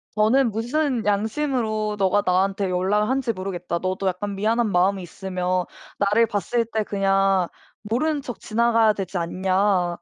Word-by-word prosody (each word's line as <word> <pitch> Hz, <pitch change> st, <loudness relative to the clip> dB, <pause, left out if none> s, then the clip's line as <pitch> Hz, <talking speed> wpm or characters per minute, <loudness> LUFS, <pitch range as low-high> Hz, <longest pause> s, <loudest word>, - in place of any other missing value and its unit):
저는 230 Hz, +4 st, +3 dB
"무슨 245 Hz, +2 st, -1 dB
양심으로 215 Hz, 0 st, 0 dB
너가 195 Hz, +1 st, +2 dB
나한테 190 Hz, +2 st, +1 dB
연락 190 Hz, +4 st, +1 dB
한 270 Hz, +1 st, +1 dB
지 235 Hz, -3 st, -1 dB
모르겠다. 185 Hz, -3 st, -4 dB
너도 185 Hz, +1 st, -2 dB
약간 195 Hz, +2 st, -2 dB
미안한 220 Hz, +2 st, +1 dB
마음이 190 Hz, +2 st, +2 dB
있으면 180 Hz, 0 st, -2 dB, 0.3 s
나를 205 Hz, +3 st, +3 dB
봤을 225 Hz, +4 st, -1 dB
때 220 Hz, -1 st, -2 dB
그냥 195 Hz, -2 st, +2 dB, 0.4 s
모르는 285 Hz, +8 st, 0 dB
척 245 Hz, -3 st, -7 dB
지나가야 230 Hz, -1 st, +2 dB
되지 190 Hz, -2 st, -4 dB
않냐." 185 Hz, +1 st, 0 dB
205 Hz, 315 characters per minute, -23 LUFS, 185-225 Hz, 0.4 s, 저는